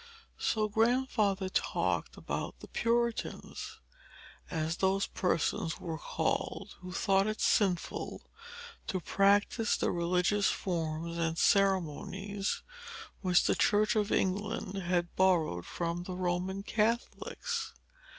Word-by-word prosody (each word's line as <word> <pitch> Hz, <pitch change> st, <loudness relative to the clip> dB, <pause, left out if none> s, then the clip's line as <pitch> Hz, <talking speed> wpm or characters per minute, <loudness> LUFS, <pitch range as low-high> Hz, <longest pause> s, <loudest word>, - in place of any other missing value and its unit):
So, 215 Hz, -1 st, +1 dB
Grandfather 220 Hz, -3 st, +2 dB
talked 185 Hz, -, -1 dB
about -, -, -4 dB
the -, -, -10 dB
Puritans, 235 Hz, 0 st, -1 dB, 0.7 s
as 160 Hz, 0 st, -1 dB
those 195 Hz, +1 st, +2 dB
persons 175 Hz, 0 st, 0 dB
were 160 Hz, -2 st, -4 dB
called -, -, -2 dB
who 180 Hz, 0 st, -8 dB
thought 195 Hz, +1 st, +2 dB
it 215 Hz, 0 st, -2 dB
sinful 185 Hz, -5 st, +1 dB, 0.6 s
to 185 Hz, -, -1 dB
practise 200 Hz, +5 st, +2 dB
the -, -, +1 dB
religious 180 Hz, +4 st, +2 dB
forms 170 Hz, -1 st, -2 dB
and 165 Hz, 0 st, 0 dB
ceremonies 195 Hz, +2 st, +1 dB, 0.6 s
which 180 Hz, -3 st, +4 dB
the -, -, +3 dB
Church 215 Hz, +2 st, +3 dB
of 210 Hz, -1 st, +1 dB
England 195 Hz, 0 st, 0 dB
had 175 Hz, -1 st, 0 dB
borrowed 165 Hz, -, +2 dB
from 170 Hz, 0 st, -2 dB
the 180 Hz, +1 st, -5 dB
Roman 185 Hz, +2 st, -1 dB
Catholics. 240 Hz, -, -1 dB
190 Hz, 110 wpm, -31 LUFS, 175-210 Hz, 0.7 s, which